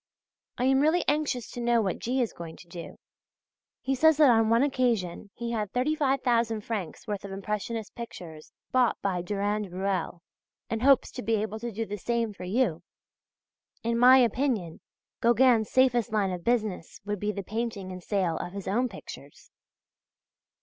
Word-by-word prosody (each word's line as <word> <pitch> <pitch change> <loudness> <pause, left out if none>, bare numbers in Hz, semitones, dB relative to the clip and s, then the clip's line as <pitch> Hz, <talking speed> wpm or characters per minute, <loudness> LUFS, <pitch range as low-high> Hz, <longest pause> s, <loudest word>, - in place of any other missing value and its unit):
I 245 - -1
am 265 +1 +4
really 315 +5 +3
anxious 290 -5 0
to 245 - -6
know 235 0 +3
what 195 -5 -1
G. 255 +2 0
is 230 - -4
going 165 -1 -8
to 185 - -15
do. 170 0 -9 0.8
He 270 - -1
says 315 +3 +4
that 295 -4 +7
on 225 -1 +3
one 230 +3 +4
occasion 235 -9 0
he 235 0 -4
had 210 -4 -2
35,000 250 -5 +1
francs' 205 -6 -5
worth 205 -2 -3
of 200 - -7
impressionist 210 +2 -4
pictures 170 -9 -9 0.2
bought 255 -2 +2
by 185 -3 0
Durand 205 +1 -2
Ruel, 185 -2 -2 0.5
and 225 -1 -1
hopes 275 0 +4
to - - -6
be 225 +2 +1
able 215 +1 -3
to 235 +1 -4
do 225 +2 -3
the 205 0 -6
same 230 0 -1
for 185 - -8
you. 190 -4 0 1.0
In 230 +1 0
my 255 +2 +8
opinion 235 - +1 0.4
Gauguin's 235 -2 +4
safest 245 -3 +3
line 205 -3 +1
of 180 -1 -5
business 215 -8 -1
would 205 -1 -3
be 210 +2 -1
the 200 -1 -5
painting 215 -2 -4
and 185 0 -7
sale 180 -4 0
of 175 - -5
his 200 -1 -6
own 240 +6 +1
pictures. 145 -7 -12
220 Hz, 170 wpm, -28 LUFS, 195-245 Hz, 1.0 s, my